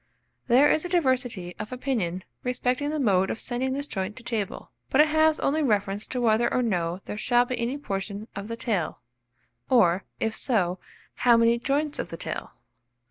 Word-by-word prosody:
There 255 Hz, +4 st, +6 dB
is 310 Hz, -, +2 dB
a 355 Hz, -, -4 dB
diversity 250 Hz, -, 0 dB
of 210 Hz, +2 st, -6 dB
opinion 225 Hz, -9 st, -2 dB, 0.2 s
respecting 250 Hz, +3 st, 0 dB
the 305 Hz, 0 st, -2 dB
mode 190 Hz, -7 st, +3 dB
of 225 Hz, -, -3 dB
sending 260 Hz, +1 st, -2 dB
this 285 Hz, +1 st, -2 dB
joint 195 Hz, -5 st, -4 dB
to 255 Hz, -, -11 dB
table; 220 Hz, -5 st, -3 dB, 0.2 s
but 265 Hz, -, +2 dB
it 305 Hz, +1 st, +6 dB
has 315 Hz, 0 st, +3 dB
only 310 Hz, +3 st, +1 dB
reference 205 Hz, -5 st, 0 dB
to 255 Hz, -, -3 dB
whether 235 Hz, 0 st, +3 dB
or 250 Hz, -, +1 dB
no 180 Hz, -4 st, -1 dB
there 210 Hz, -, -5 dB
shall 245 Hz, +1 st, +3 dB
be 255 Hz, 0 st, -4 dB
any 240 Hz, +4 st, -1 dB
portion 200 Hz, -4 st, -4 dB
of 200 Hz, +1 st, -5 dB
the 230 Hz, 0 st, -5 dB
tail, 205 Hz, -9 st, -1 dB, 0.7 s
or, 195 Hz, -7 st, +4 dB, 0.2 s
if 220 Hz, 0 st, -1 dB
so, 185 Hz, -7 st, 0 dB, 0.4 s
how 240 Hz, -2 st, +5 dB
many 230 Hz, +1 st, +4 dB
joints 285 Hz, +4 st, -1 dB
of -, -, -3 dB
the 165 Hz, -, -6 dB
tail. -, -, -5 dB
235 Hz, 190 wpm, -26 LUFS, 200-260 Hz, 0.7 s, There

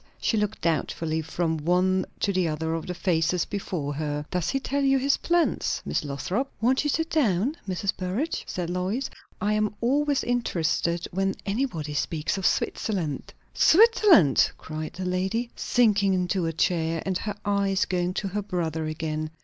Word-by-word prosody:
She -, -, +1 dB
looked 210 Hz, 0 st, -1 dB
doubtfully 160 Hz, 0 st, -1 dB
from 160 Hz, +1 st, -1 dB
one 180 Hz, +4 st, +1 dB
to 200 Hz, -, +1 dB
the 185 Hz, -2 st, +1 dB
other 160 Hz, +1 st, -2 dB
of 165 Hz, -1 st, -4 dB
the 180 Hz, -, -2 dB
faces 170 Hz, -1 st, +1 dB
before 170 Hz, -8 st, -3 dB
her. 150 Hz, 0 st, -3 dB
"Does 180 Hz, -3 st, -1 dB
he 270 Hz, -, 0 dB
tell 280 Hz, +1 st, -1 dB
you 270 Hz, -1 st, +4 dB
his 275 Hz, +1 st, +2 dB
plans, 345 Hz, -1 st, +1 dB
Miss -, -, -1 dB
Lothrop?" 180 Hz, -, -2 dB
"Won't 255 Hz, +5 st, +2 dB
you 295 Hz, -, 0 dB
sit 325 Hz, +3 st, 0 dB
down, 245 Hz, -, +2 dB
Mrs. 190 Hz, +2 st, -1 dB
Burrage?" 195 Hz, -, -2 dB
said 175 Hz, -1 st, -3 dB
Lois. 190 Hz, +9 st, -2 dB, 0.3 s
"I 210 Hz, +1 st, +1 dB
am 215 Hz, -1 st, 0 dB
always 285 Hz, +3 st, +1 dB
interested 170 Hz, -7 st, 0 dB
when 195 Hz, +1 st, 0 dB
anybody 195 Hz, -, -2 dB
speaks 155 Hz, +3 st, -1 dB
of 190 Hz, -, +2 dB
Switzerland." 175 Hz, -10 st, -1 dB, 0.2 s
"Switzerland!" 390 Hz, -, +6 dB
cried 155 Hz, 0 st, -6 dB
the 185 Hz, -, -5 dB
lady, 190 Hz, +6 st, -1 dB
sinking 205 Hz, -5 st, +3 dB
into 180 Hz, -1 st, 0 dB
a -, -, 0 dB
chair, 165 Hz, 0 st, 0 dB
and 190 Hz, -2 st, -1 dB
her 210 Hz, -1 st, -4 dB
eyes 200 Hz, -1 st, +1 dB
going 180 Hz, 0 st, -1 dB
to 195 Hz, -, -2 dB
her 205 Hz, +2 st, -2 dB
brother 165 Hz, -5 st, -2 dB
again. 155 Hz, 0 st, -3 dB
185 Hz, 165 wpm, -26 LUFS, 165-220 Hz, 0.3 s, Switzerland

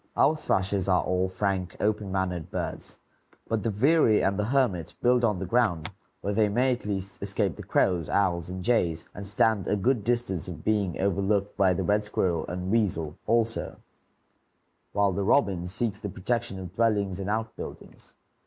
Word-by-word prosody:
Our 155 Hz, -, +4 dB
thrushes 95 Hz, -8 st, 0 dB
are 90 Hz, -, +3 dB
all 90 Hz, 0 st, 0 dB
frank, 95 Hz, -1 st, -2 dB
open 105 Hz, -2 st, 0 dB
mannered 90 Hz, -4 st, -2 dB
birds; -, -, -5 dB, 0.5 s
but 115 Hz, -2 st, 0 dB
the 115 Hz, -, -1 dB
veery 115 Hz, +1 st, +4 dB
and 100 Hz, +1 st, +1 dB
the 105 Hz, -, +1 dB
hermit 115 Hz, -, 0 dB
build 125 Hz, 0 st, +3 dB
on 105 Hz, -4 st, +2 dB
the 95 Hz, -, -4 dB
ground, 95 Hz, -6 st, +1 dB, 0.3 s
where 100 Hz, -, -2 dB
they 105 Hz, 0 st, +3 dB
may 125 Hz, +5 st, +2 dB
at 120 Hz, -4 st, -6 dB
least 95 Hz, -1 st, -4 dB
escape -, -, 0 dB
the -, -, -8 dB
crows, 85 Hz, -5 st, +1 dB
owls, 90 Hz, -3 st, +1 dB
and 90 Hz, 0 st, -5 dB
jays, 85 Hz, -8 st, +1 dB
and 100 Hz, -1 st, -6 dB
stand 105 Hz, 0 st, +2 dB
a -, -, +2 dB
good 115 Hz, +2 st, +1 dB
chance 115 Hz, -8 st, -1 dB
of -, -, -8 dB
being 100 Hz, -5 st, 0 dB
overlooked 100 Hz, +1 st, 0 dB
by 95 Hz, -2 st, +3 dB
the -, -, -1 dB
red 105 Hz, +1 st, +2 dB
squirrel 90 Hz, -6 st, -1 dB
and 90 Hz, +1 st, -4 dB
weasel 85 Hz, -9 st, 0 dB
also; 115 Hz, 0 st, 0 dB, 1.2 s
while 100 Hz, -1 st, +2 dB
the 95 Hz, -, -2 dB
robin 95 Hz, -6 st, +2 dB
seeks 105 Hz, +2 st, -2 dB
the 105 Hz, -, -5 dB
protection 105 Hz, +2 st, -2 dB
of 90 Hz, -2 st, -8 dB
dwellings 105 Hz, -4 st, +1 dB
and 100 Hz, +1 st, -3 dB
outbuildings. 110 Hz, +1 st, -6 dB
100 Hz, 175 wpm, -27 LUFS, 95-110 Hz, 1.2 s, Our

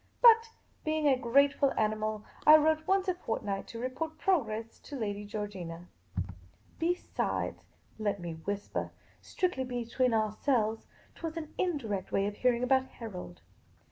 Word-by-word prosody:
But, 460 Hz, -1 st, +7 dB, 0.3 s
being 310 Hz, -1 st, +1 dB
a 275 Hz, -, +6 dB
grateful 275 Hz, +3 st, +3 dB
animal, 215 Hz, 0 st, 0 dB, 0.2 s
I 305 Hz, +1 st, +11 dB
wrote 315 Hz, +1 st, +2 dB
once 385 Hz, 0 st, +3 dB
a 370 Hz, -, +3 dB
fortnight 210 Hz, -, -3 dB
to 230 Hz, -, -7 dB
report 285 Hz, +6 st, -3 dB
progress 230 Hz, -, 0 dB
to 290 Hz, -, -9 dB
Lady 205 Hz, -4 st, -3 dB
Georgina. 185 Hz, -5 st, -6 dB, 0.9 s
Besides 345 Hz, +2 st, -1 dB, 0.2 s
— -, -, -32 dB
let 205 Hz, -2 st, 0 dB
me 170 Hz, -1 st, -5 dB
whisper 200 Hz, +6 st, -3 dB, 0.2 s
— -, -, -31 dB
strictly 360 Hz, -8 st, -1 dB
be 245 Hz, -2 st, -3 dB
tween 250 Hz, +2 st, +1 dB
ourselves 220 Hz, +1 st, +1 dB
— -, -, -27 dB
't -, -, -17 dB
was 330 Hz, 0 st, -4 dB
an 310 Hz, -2 st, -6 dB
indirect 225 Hz, -, -1 dB
way 195 Hz, -, +2 dB
of 205 Hz, 0 st, -3 dB
hearing 250 Hz, -1 st, +2 dB
about 260 Hz, +1 st, +3 dB
Harold. 180 Hz, -, -8 dB
240 Hz, 155 wpm, -31 LUFS, 210-310 Hz, 0.9 s, I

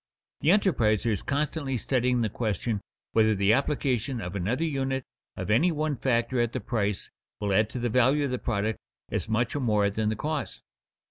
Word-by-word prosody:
The 150 Hz, -, +1 dB
enterpriser 120 Hz, -, +3 dB
is 105 Hz, -, -1 dB
constantly 145 Hz, -2 st, -1 dB
studying 125 Hz, 0 st, +1 dB
the 110 Hz, -, +1 dB
question 105 Hz, 0 st, -2 dB, 0.3 s
whether 110 Hz, -1 st, +4 dB
the 100 Hz, +2 st, +3 dB
application 135 Hz, -2 st, 0 dB
of 90 Hz, -2 st, -5 dB
another 105 Hz, -, 0 dB
unit 135 Hz, -4 st, -1 dB, 0.3 s
of -, -, -2 dB
any 160 Hz, +12 st, +4 dB
one 155 Hz, -1 st, -1 dB
factor 120 Hz, 0 st, 0 dB
at 120 Hz, -1 st, +1 dB
the -, -, -1 dB
price 105 Hz, -5 st, -2 dB, 0.3 s
will 100 Hz, -1 st, 0 dB
add 110 Hz, +2 st, +3 dB
to -, -, -6 dB
the 120 Hz, 0 st, 0 dB
value 130 Hz, +5 st, +3 dB
of 135 Hz, -, -2 dB
the 125 Hz, -, -1 dB
product 110 Hz, -1 st, -1 dB, 0.3 s
as -, -, -2 dB
much 115 Hz, +3 st, 0 dB
or -, -, 0 dB
more 105 Hz, -5 st, +2 dB
than 105 Hz, +1 st, 0 dB
the 110 Hz, -, -1 dB
cost. 150 Hz, +6 st, -3 dB
120 Hz, 190 wpm, -27 LUFS, 110-135 Hz, 0.3 s, whether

